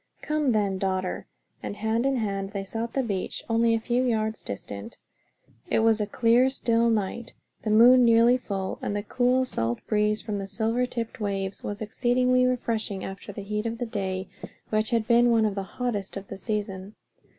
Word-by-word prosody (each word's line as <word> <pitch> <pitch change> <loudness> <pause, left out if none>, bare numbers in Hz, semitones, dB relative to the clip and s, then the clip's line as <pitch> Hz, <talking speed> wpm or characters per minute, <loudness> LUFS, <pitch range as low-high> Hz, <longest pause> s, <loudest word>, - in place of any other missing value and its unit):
"Come 300 -3 +1
then, 200 -4 +1
daughter," 185 -1 -2 0.3
and - - -5
hand 220 +4 0
in 275 - +1
hand 200 -4 -2
they 200 -1 -3
sought 225 +4 -4
the 270 - +1
beach, 200 -6 -3
only 230 0 +3
a - - 0
few 240 +2 0
yards 220 -3 0
distant. 100 0 -7 0.7
It - - +2
was 225 -1 +3
a 210 - -1
clear 240 +4 +3
still 235 -3 +1
night, 225 +1 -2 0.3
the 215 - -3
moon 245 +4 +7
nearly 230 +1 +6
at 250 - 0
the - - -30
full, 195 -2 -3
and 205 - -2
the 205 - -2
cool 250 +3 +2
salt 115 - -1
breeze 210 0 +1
from 205 -2 -3
the 195 - -5
silver 225 +4 0
tipped 230 -2 -5
waves 195 -2 -3
was 205 +1 -4
exceedingly 250 +3 +2
refreshing 225 -5 -2
after 195 +1 -7
the 200 0 -7
heat 210 +2 -2
of 230 0 -3
the 245 - -2
day; 190 -4 -3 0.4
which 215 0 +1
had 230 -2 0
been 240 0 +5
one 225 -2 +4
of 210 - 0
the 195 - -3
hottest 205 0 -4
of 195 0 -9
the 195 - -6
season. 200 -2 -4
220 Hz, 195 wpm, -26 LUFS, 200-235 Hz, 0.7 s, moon